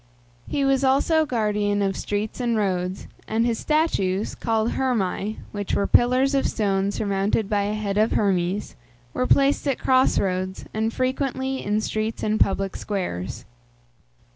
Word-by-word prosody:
He 280 -1 0
was 275 0 +2
also 300 +4 +3
guardian 210 -4 0
of 195 -1 0
streets 210 +3 -3
and 235 -2 0
roads, 185 -2 -1 0.2
and 225 +1 +1
his 235 -2 0
statues, 215 - 0
called 225 0 0
Hermæ 215 -5 -1 0.2
(which 205 -2 -3
were 200 - +1
pillars 255 +3 +3
of 275 - +2
stone 195 -2 0
surmounted 200 +1 0
by 205 -1 0
a 210 +1 -1
head 205 -1 -1
of 220 +1 +2
Hermes), 190 -1 0 0.4
were 255 - 0
placed 280 +1 +3
at 275 - +1
cross 260 0 +3
roads, 185 0 -2
and 220 +1 0
frequently 265 +1 -2
in 210 +1 0
streets 215 +1 -3
and 215 0 0
public 195 0 +1
squares. 180 - -4
215 Hz, 150 wpm, -24 LUFS, 200-255 Hz, 0.4 s, also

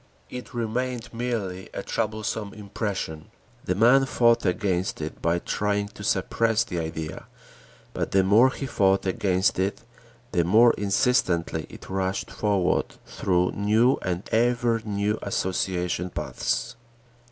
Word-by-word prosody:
It 125 0 -7
remained 120 +1 -2
merely 110 -6 -3
a - - -4
troublesome 110 -1 -3
impression. 100 -6 -4 0.4
The 90 - 0
man 125 +6 +5
fought 115 -3 +3
against 90 -1 0
it 75 0 -6
by 85 +1 +2
trying 100 +3 -1
to 105 - -11
suppress 115 +2 +1
the 90 - -4
idea 80 -1 -5 0.7
but - - -2
the 95 -1 +3
more 110 +7 +6
he 135 - -5
fought 95 -6 +2
against 95 0 +1
it, 95 +3 -1 0.5
the 90 -4 +2
more 110 +7 +6
insistently 95 -6 +1
it - - -12
rushed 95 0 -2
forward 100 -4 0
through 90 -1 0
new 110 +5 +2
and 90 0 -3
ever 120 0 +2
new 105 0 -1
association 90 -2 -1
paths. 75 - -2
100 Hz, 130 wpm, -25 LUFS, 90-115 Hz, 0.7 s, more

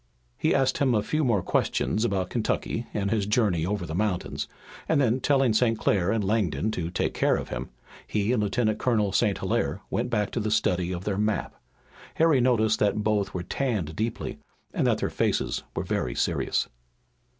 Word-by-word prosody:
He - - +1
asked 130 0 +2
him 130 -4 +3
a 105 - +2
few 155 0 0
more 110 -9 +2
questions 110 - 0
about 95 -5 -1
Kentucky 115 0 -1
and 100 -1 -1
his 105 -3 0
journey 105 -7 +2
over 100 -3 -2
the 80 - -6
mountains, 95 0 -1 0.4
and 160 - +3
then, 125 -2 +2
telling 135 -3 +3
St. 115 0 +2
Clair 95 -4 +1
and 110 -2 0
Langdon 100 -3 0
to 85 -5 -3
take 90 - -1
care - - +2
of - - -4
him, - - -4 0.4
he 105 +1 0
and 125 -4 +2
Lieutenant 110 +1 0
Colonel 110 -5 +1
St. 100 0 +2
Hilaire - - -1
went - - -1
back 105 -4 0
to - - -2
the 110 -1 -1
study 90 -3 +1
of 90 0 -4
their 100 -1 -1
map. 105 0 0 0.6
Harry 160 -5 +4
noted 110 -3 +3
that 105 +1 +1
both 105 -3 0
were 90 - -2
tanned 100 - -2
deeply 110 +1 -3 0.3
and - - +1
that - - +3
their - - -2
faces - - 0
were - - -1
very 60 -1 -2
serious. - - 0
105 Hz, 190 wpm, -26 LUFS, 95-120 Hz, 0.6 s, Harry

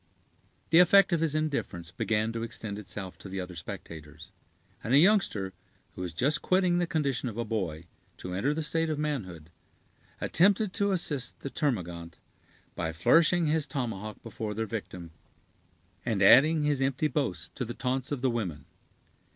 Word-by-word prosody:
The 165 - +7
effect 190 +1 +6
of 170 - +2
his 155 -2 0
indifference 140 - -2
began 110 +3 -1
to 115 - -3
extend 110 -3 -5
itself 95 -2 -7
to 95 - -9
the 95 +1 -4
other 90 -1 -6
spectators; 80 +1 -9 0.5
and 120 +5 +2
a - - +8
youngster, 150 - +3 0.4
who - - -8
was 90 -2 -3
just 135 - +1
quitting 185 -1 +2
the 175 - 0
condition 140 -7 -1
of 110 - -9
a 120 - -2
boy 90 -8 -3 0.3
to 90 - -6
enter 100 +10 0
the 160 - -2
state 165 +1 0
of 155 - -1
manhood, 95 - -4 0.7
attempted 200 +3 +3
to 200 -2 +1
assist 150 -8 -2
the 140 - -5
termagant, 85 - -2 0.6
by 80 -2 -3
flourishing 165 - +4
his 155 -1 +1
tomahawk 110 -7 -4
before 110 -2 -5
their 110 +1 -1
victim, 95 -6 -6 0.9
and 110 -5 0
adding 150 +9 +7
his 145 -2 +1
empty 135 +3 +1
boasts 95 - -2
to 130 - -3
the 120 0 -6
taunts 130 0 -2
of 140 -4 -2
the 130 -1 +2
women. 90 -12 -4
120 Hz, 165 wpm, -29 LUFS, 95-155 Hz, 0.9 s, a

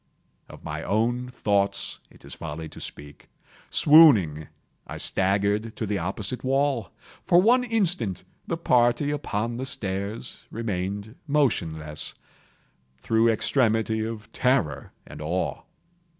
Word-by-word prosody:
Of - - -13
my - - -5
own 120 +4 0
thoughts 100 -5 -1
it - - -19
is - - -9
folly 80 0 -6
to - - -11
speak. 75 0 -10 0.4
Swooning, 110 - +6 0.4
I - - -6
staggered 100 +3 +1
to 110 - -3
the 105 -1 -1
opposite 100 +7 -4
wall. 135 - +1 0.4
For 175 - +6
one 240 +6 +4
instant 185 - -1 0.2
the - - -2
party 125 +4 +2
upon 120 -5 -2
the 130 - -3
stairs 100 0 -3
remained 100 -1 -4
motionless, 80 - -1 0.8
through 110 - +2
extremity 110 -1 +1
of 110 -1 -6
terror 125 - 0
and - - -10
of 75 - -4
awe. 90 +3 -2
110 Hz, 120 wpm, -25 LUFS, 95-130 Hz, 0.8 s, Swooning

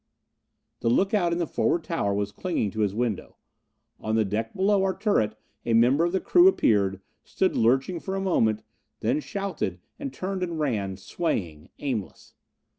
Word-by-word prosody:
The 115 - 0
look 195 - +2
out 175 -5 +2
in 170 - 0
the 175 - 0
forward 165 +2 0
tower 160 -12 -1
was 100 0 -1
clinging 110 - -2
to 110 - -6
his 105 -2 +1
window. 115 -4 -2 0.6
On 110 0 -1
the 110 -1 +3
deck 110 +3 -3
below 195 +1 +3
our 190 -1 0
turret 110 - +1 0.3
a 115 - 0
member 125 +7 +4
of 175 - 0
the 190 - +1
crew 355 - +5
appeared, 100 - +2 0.2
stood 190 - 0
lurching 135 +9 +2
for 190 +3 -4
a - - -1
moment, 110 - +1 0.4
then 115 +7 +1
shouted, 185 - -3 0.2
and 135 - -4
turned 185 +6 -4
and 170 -3 -2
ran, 105 -10 -1
swaying, 90 - -3
aimless. 125 -9 -5
130 Hz, 175 wpm, -26 LUFS, -, 0.6 s, crew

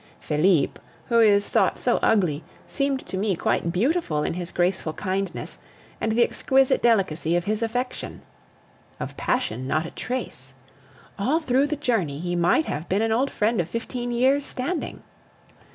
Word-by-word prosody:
Felipe, 155 0 +2 0.3
who 235 -1 +4
is 205 -2 +5
thought - - +2
so - - +2
ugly, 175 -8 +2 0.2
seemed 275 -2 -1
to 190 - -5
me 200 -1 0
quite 170 0 0
beautiful 190 - 0
in - - -1
his 175 0 -5
graceful 175 -2 0
kindness 195 +2 -3 0.4
and 225 - 0
the 240 +1 +4
exquisite 265 +2 +2
delicacy 185 -8 +2
of 175 - +1
his 215 +4 -1
affection. 245 +3 -3 0.8
Of - - -5
passion, 250 - -1
not 155 +4 0
a - - -7
trace. 255 +2 -5 0.6
All 270 +11 +2
through 275 -2 +2
the 300 - -1
journey 225 - -1
he 175 +1 -2
might 175 - +3
have 155 +3 -4
been 200 +4 +2
an 225 - 0
old 255 +5 +2
friend 215 -1 +1
of 170 - -6
fifteen 240 +3 -4
years' 260 +4 +3
standing. 295 +7 -4
215 Hz, 160 wpm, -24 LUFS, 175-250 Hz, 0.8 s, is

